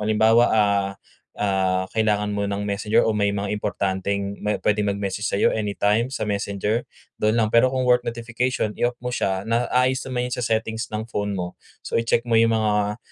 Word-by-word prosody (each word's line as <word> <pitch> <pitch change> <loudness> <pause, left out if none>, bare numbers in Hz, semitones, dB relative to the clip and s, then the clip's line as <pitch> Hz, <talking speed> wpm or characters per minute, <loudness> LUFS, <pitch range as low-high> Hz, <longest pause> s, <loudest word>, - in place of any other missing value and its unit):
halimbawa, 110 +2 +4
ah, 100 -2 +2 0.5
ah 95 -2 +1
kailangan 105 -2 +1
mo 100 - -1
ng 100 0 -2
Messenger 100 +1 +1
o 110 - +1
may 105 -1 +2
mga 100 0 -2
importanteng 100 -1 -2
ma 105 0 0
pwedeng 105 -1 +2
mag-message 100 +1 -3
sa'yo 100 - +2
anytime 105 +3 0
sa 135 - -3
Messenger 100 +2 -1 0.4
dun 110 +2 +3
lang. 110 -2 +2
Pero 120 +2 +5
kung 130 -1 0
work 125 0 +4
notification 115 -1 -2
i-off 120 0 -1
mo 125 0 -4
siya 95 -1 -1
naayos 125 +3 +1
naman 125 -1 -1
yun 125 - -3
sa 125 - -4
settings 110 0 -1
ng 110 +1 -4
phone 105 -3 -3
mo. 90 0 -4 0.3
So, - - -5
i-check 115 +1 +1
mo 115 - +2
yung 115 0 +5
mga, 105 -1 +1
105 Hz, 185 wpm, -23 LUFS, 100-115 Hz, 0.5 s, Pero